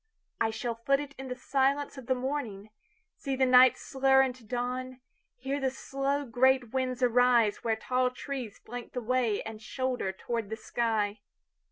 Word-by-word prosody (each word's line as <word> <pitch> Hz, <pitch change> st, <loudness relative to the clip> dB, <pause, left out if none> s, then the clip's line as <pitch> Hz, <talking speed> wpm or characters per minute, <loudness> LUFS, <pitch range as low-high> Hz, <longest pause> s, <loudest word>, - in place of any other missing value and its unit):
I 225 Hz, -, +2 dB
shall 230 Hz, +2 st, -3 dB
foot 255 Hz, +5 st, +1 dB
itIn 280 Hz, -2 st, -7 dB
the 250 Hz, -, -3 dB
silence 275 Hz, +3 st, 0 dB
of 265 Hz, -3 st, -10 dB
the 260 Hz, -, +2 dB
morning, 250 Hz, -6 st, -4 dB, 0.5 s
See 275 Hz, -1 st, -3 dB
the 260 Hz, 0 st, +3 dB
night 255 Hz, 0 st, +7 dB
slur 265 Hz, 0 st, +3 dB
into 255 Hz, -2 st, -4 dB
dawn, 250 Hz, +2 st, -3 dB, 0.4 s
Hear 270 Hz, +3 st, -3 dB
the 265 Hz, -1 st, +1 dB
slow 275 Hz, +2 st, -2 dB
great 255 Hz, 0 st, +2 dB
winds 255 Hz, -1 st, -1 dB
ariseWhere 235 Hz, -2 st, +3 dB
tall 255 Hz, +2 st, +1 dB
trees 250 Hz, -4 st, -6 dB
flank 245 Hz, +1 st, -9 dB
the 250 Hz, -, -2 dB
wayAnd 225 Hz, -3 st, -1 dB
shoulder 250 Hz, -3 st, -2 dB
toward 230 Hz, +2 st, -4 dB
the 220 Hz, -, -3 dB
sky. 220 Hz, -3 st, -1 dB
250 Hz, 155 wpm, -29 LUFS, 230-265 Hz, 0.5 s, night